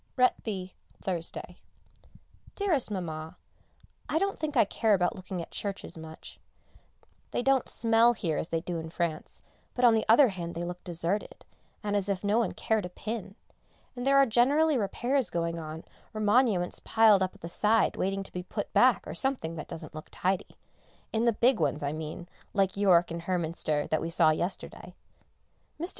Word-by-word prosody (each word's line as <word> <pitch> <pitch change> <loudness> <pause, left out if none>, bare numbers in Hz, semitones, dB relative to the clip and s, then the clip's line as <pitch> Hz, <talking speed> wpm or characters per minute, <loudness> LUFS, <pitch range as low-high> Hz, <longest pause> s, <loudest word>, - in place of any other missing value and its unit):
RETBY, 205 -7 0 0.3
Thursday. 175 -3 -4 1.0
Dearest 355 - 0
Mamma, 160 -5 -5 0.7
I - - +1
don't 395 +3 0
think 300 -3 -2
I 225 - +6
care 215 +1 +2
about 180 -2 0
looking 185 -2 -5
at - - -13
churches 200 -1 -5
much. 160 -1 -10 0.9
They - - -1
don't 270 -1 +2
smell 230 +1 +4
here 170 -9 -1
as 160 - -2
they 165 -1 -1
do 175 -1 -4
in 160 0 -6
France, 165 -2 -4 0.3
but 250 - +3
on 235 - +7
the 220 - +2
other 250 +3 +7
hand 170 -3 -6
they 170 - -3
look 175 +1 -6
deserted, 175 +3 -3 0.4
and 205 -1 -1
as 205 0 0
if 195 -1 -1
no 205 +3 +2
one 235 - 0
cared 220 -4 0
a - - -13
pin, 200 +1 -6 0.6
and 245 +1 -4
there 275 0 +5
are 275 - +7
generally 280 +7 +3
repairs 245 +4 0
going 170 0 -2
on 155 0 -7 0.3
or - - -3
monuments 210 -4 +2
piled 220 -3 +5
up 185 0 -1
at - - -19
the 170 - -5
side 210 +5 +2
waiting 195 +1 -1
to - - -13
be 180 - -3
put 180 - -5
back - - +4
or - - -6
something 265 -12 -1
that 155 -2 -7
doesn't 160 -2 -8
look 155 0 -8
tidy 185 0 -2 0.6
in 225 +1 +1
the 235 - +5
big 235 +2 +3
ones 150 - 0
I 140 - -1
mean, 160 +2 -6 0.3
like 195 -2 +2
York 180 -4 +4
and 170 0 -4
Hernminster 165 -4 -1
that 155 - +2
we 165 - -3
saw 165 -2 +4
yesterday. 175 +4 -4 0.8
Mr. 345 +3 -3
195 Hz, 180 wpm, -29 LUFS, 170-230 Hz, 1.0 s, on